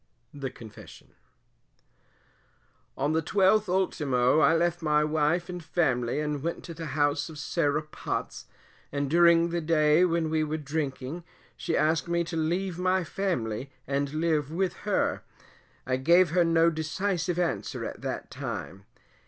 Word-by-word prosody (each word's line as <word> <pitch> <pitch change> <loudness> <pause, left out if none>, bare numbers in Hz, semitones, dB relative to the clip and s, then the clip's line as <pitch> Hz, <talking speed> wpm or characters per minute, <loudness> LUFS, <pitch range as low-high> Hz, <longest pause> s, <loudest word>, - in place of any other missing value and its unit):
THE 140 -2 -4
CONFESSION. 110 -4 -13 1.9
On 145 +3 0
the 160 - +2
12th 195 +4 +3
ultimo, 145 -8 +2
I 165 - +5
left 175 +1 +1
my 150 -1 +2
wife 155 +3 +1
and 180 -2 -6
family 135 -6 0
and 150 -2 -2
went 170 +3 -3
to 170 - -7
the 165 0 -6
house 145 0 +1
of 155 - -10
Sarah 150 0 0
Potts, 155 - -5 0.5
and 140 -1 -2
during 170 0 +5
the 170 0 -1
day 155 +1 +3
when 165 -3 +1
we 160 -1 +1
were 155 +1 -2
drinking, 145 +1 -4 0.3
she 165 - -2
asked 155 +2 +1
me 170 0 +1
to 170 0 -6
leave 175 +3 -1
my 185 0 +2
family 135 - -2 0.2
and 140 +1 -1
live 155 -3 0
with 185 +2 0 0.2
her; - - +1 0.6
I 130 0 0
gave 170 +5 +4
her 175 +1 +4
no 165 0 +4
decisive 175 +3 -2
answer 175 -2 -2
at - - -7
that - - -5
time. 95 +1 -6
160 Hz, 150 wpm, -27 LUFS, 145-175 Hz, 1.9 s, I